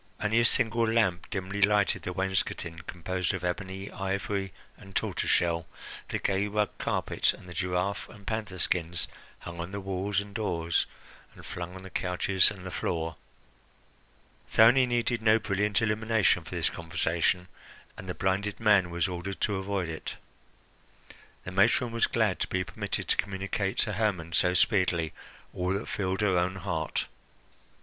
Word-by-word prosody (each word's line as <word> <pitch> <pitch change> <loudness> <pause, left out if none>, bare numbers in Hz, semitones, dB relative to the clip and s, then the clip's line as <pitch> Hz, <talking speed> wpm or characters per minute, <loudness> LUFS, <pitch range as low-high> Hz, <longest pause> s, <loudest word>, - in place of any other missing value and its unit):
Only 110 +2 +2
a 120 - +4
single 115 -1 +3
lamp 95 -6 +2
dimly 95 0 -3
lighted 105 0 +4
the 90 - -4
wainscoting, 95 -3 -1
composed 90 +2 -2
of 95 - -5
ebony, 95 +2 -3
ivory, 95 0 -2 0.2
and 95 -1 -14
tortoise - - 0
shell, 85 -1 +2 0.4
the - - 0
gay 100 +1 0
rug 105 0 0
carpet, - - +1
and - - -14
the 90 - -8
giraffe 95 +1 -1
and 100 -3 -14
panther 105 -3 -3
skins 85 -1 0 0.3
hung 85 0 -8
on 85 +2 -4
the 100 - -4
walls 95 +1 -1
and 100 0 -7
doors 85 -6 0 0.5
and - - -13
flung 90 +1 -6
on 95 - -9
the 95 - -10
couches 90 +1 +2
and 95 -3 -9
the 95 - -5
floor. 80 -2 -2 1.3
Thyone 120 +4 +6
needed 120 -1 0
no 110 0 +5
brilliant 105 -1 +1
illumination 110 -1 +2
for - - -7
this - - +1
conversation, 85 +2 0 0.5
and 95 - -9
the 90 - -3
blinded 100 +2 0
man 100 -5 +4
was 85 -1 0
ordered 90 +2 -5
to 100 -2 +1
avoid 95 -2 -1
it. 80 -1 -5 1.3
The 90 - -6
matron 110 +5 +3
was 115 0 +2
glad 110 -8 +1
to - - 0
be 95 0 0
permitted - - -4
to - - +3
communicate 100 0 -1
to 105 - 0
Hermon 95 -6 -1
so 90 +2 +3
speedily 90 -5 +2 0.4
all 90 +1 0
that 100 +3 -3
filled 95 0 -1
her 95 -4 +3
own 90 +2 0
heart. 85 -4 -2
95 Hz, 160 wpm, -29 LUFS, 90-105 Hz, 1.3 s, Thyone